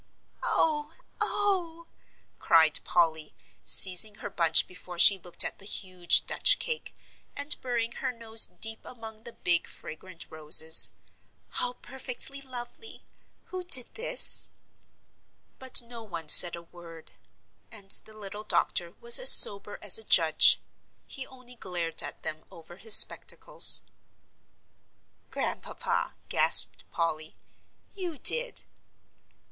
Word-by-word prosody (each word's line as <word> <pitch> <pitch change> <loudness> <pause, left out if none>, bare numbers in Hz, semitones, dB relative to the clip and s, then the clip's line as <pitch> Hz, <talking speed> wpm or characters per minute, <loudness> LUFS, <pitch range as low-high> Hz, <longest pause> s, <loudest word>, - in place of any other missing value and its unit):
"Oh 300 -1 -5 0.3
oh!" 355 -5 -6 0.5
cried 160 -2 0
Polly, 160 -3 -5 0.3
seizing 190 +3 +3
her - - -12
bunch 165 -2 +2
before 180 -1 -16
she 195 +3 +3
looked 175 -1 -3
at - - -10
the 200 - -12
huge 185 -4 -2
Dutch - - 0
cake, 475 -2 -8 0.4
and 285 +1 -3
burying 235 -2 -7
her 260 +1 -8
nose 225 -2 -1
deep 225 0 -5
among 225 -2 -15
the 235 - -11
big 170 -1 -5
fragrant 165 +2 -15
roses, 160 +1 +3 0.6
"how 245 - -6
perfectly 265 +2 -10
lovely! 260 - -13 0.5
Who 370 - -8
did 275 -9 -1
do 445 - -11
this?" - - -2 1.1
But 260 -2 +4
no 235 0 -14
one 170 -8 -11
said 175 +2 +8
a 170 - -15
word. 165 -1 -19 0.6
And 200 -3 -14
the 215 +1 -4
little 205 0 -12
doctor - - -4
was 470 +1 +5
as - - +6
sober 200 0 +8
as 205 0 -3
a - - -13
judge. 160 -6 +1 0.5
He 265 - -13
only 255 -1 -19
glared 170 -5 -7
at - - -13
them 155 0 -9
over 170 +1 -18
his 220 +2 0
spectacles. - - +5 1.5
"Grandpapa," - - -8
gasped - - +2
Polly, 155 -2 -7 0.6
"you 360 -6 -10
did." 480 - -1
215 Hz, 125 wpm, -23 LUFS, 170-260 Hz, 1.5 s, said